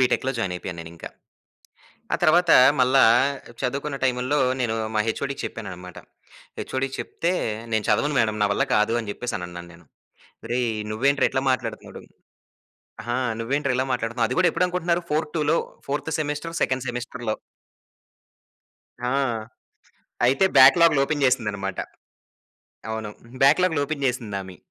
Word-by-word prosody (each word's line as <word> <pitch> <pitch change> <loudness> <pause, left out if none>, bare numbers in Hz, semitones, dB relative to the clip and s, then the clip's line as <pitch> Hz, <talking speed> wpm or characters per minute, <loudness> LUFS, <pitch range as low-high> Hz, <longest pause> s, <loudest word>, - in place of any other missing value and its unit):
బిటెక్‌లో 130 +1 +2
join 95 -5 -1
అయిపోయాను 90 -1 -7
నేనింకా. 85 0 -9 1.1
ఆ - - +4
తర్వాత 170 +2 +4 0.3
మల్ల 130 +1 +3 0.7
చదువుకున్న 140 +3 -2
టైముల్లో 130 +3 +1 0.2
నేను 120 -3 0 0.2
మా - - +2
హెచ్ఓడికి 140 +5 -3
చెప్పానన్నమాట. 90 -5 -8 0.6
హెచ్ఓడికి 130 0 -3
చెప్తే, 170 - -2 0.4
"నేను 110 -1 +1
చదవను 145 +8 +2
మేడమ్ 110 -2 +1
నా - - +4
వల్ల 100 - +1
కాదు" 105 +2 +2
అని 110 -3 -6
చెప్పేసి 120 +1 -4
అనన్నాను 85 -1 -8
నేను. 85 +1 -18 0.6
"ఒరేయ్! 120 -1 0 0.2
నువ్వేంట్రా 140 +6 +2
ఇట్లా 130 - -1
మాట్లాడుతున్నాడు 130 - -4 1.1
ఆ! - - +1 0.2
నువ్వేంట్రా 135 +4 -1
ఇలా 130 - +1
మాట్లాడుతున్నావు" 120 -1 0
అది - - -3
కూడా 185 - +5
ఎప్పుడు 180 - +1
అనుకుంటున్నారు 175 -1 -1
ఫోర్ 155 +1 +1
టులో 150 +1 +2 0.3
ఫోర్త్ 145 +3 -3
సెమెస్టర్ 150 +2 -3
సెకండ్ 130 0 -1
సెమిస్టర్‌లో. 120 -2 -4 1.7
ఆ! 125 - 0 1.2
అయితే 135 +8 +3
బ్యాక్‌లాగ్లు 145 +3 +7
ఓపెన్ 145 0 -2
చేసిందనమాట. 105 -6 0 1.1
అవును. 110 -1 -4 0.4
బ్యాక్‌లాగ్లు 160 +2 +4
ఓపెన్ 140 -1 -4
చేసిందామె. 100 -7 -4
125 Hz, 125 wpm, -24 LUFS, 110-145 Hz, 1.7 s, బ్యాక్‌లాగ్లు